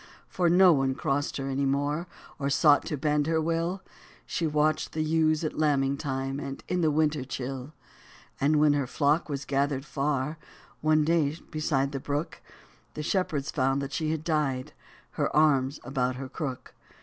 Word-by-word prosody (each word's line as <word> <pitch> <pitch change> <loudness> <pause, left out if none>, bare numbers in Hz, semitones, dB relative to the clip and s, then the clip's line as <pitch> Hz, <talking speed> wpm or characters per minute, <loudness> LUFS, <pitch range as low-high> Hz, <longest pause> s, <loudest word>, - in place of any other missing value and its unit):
For 175 -2 +1
no 180 +1 +7
one 135 -2 +1
crossed 140 +2 -1
her 135 -1 -3
any 135 +1 -1
more, 145 +5 -1 0.3
Or 140 -1 -1
sought 145 +1 +4
to 150 - -2
bend 150 +1 +1
her 160 0 +2
will; 165 +4 -1 0.4
She 165 - -1
watched 150 +1 +1
the 155 - 0
ewes 155 0 +2
at 155 - -3
lambing 140 -3 +2
time, 135 -1 -3
And 135 -2 -6
in 180 -1 0
the 160 - +3
winter 150 -2 +1
chill. 130 +2 -5 0.7
And 145 +3 +3
when 150 -1 +5
her 140 -3 0
flock 150 +4 +1
was 140 -1 -4
gathered 140 0 0
far 150 +1 -2 0.4
One 155 0 +3
day 155 -2 +1
beside 145 -3 0
the 135 - -3
brook, 145 +4 -3 0.5
The 150 - -4
shepherds 155 -5 -1
found 135 -1 +1
that 140 - -6
she 155 -2 -1
had 155 -1 -2
died. 145 -6 -1 0.4
Her - - -1
arms 145 -2 +3
about 130 -1 -1
her 130 0 -6
crook. 130 -4 -5
145 Hz, 175 wpm, -28 LUFS, 135-155 Hz, 0.7 s, no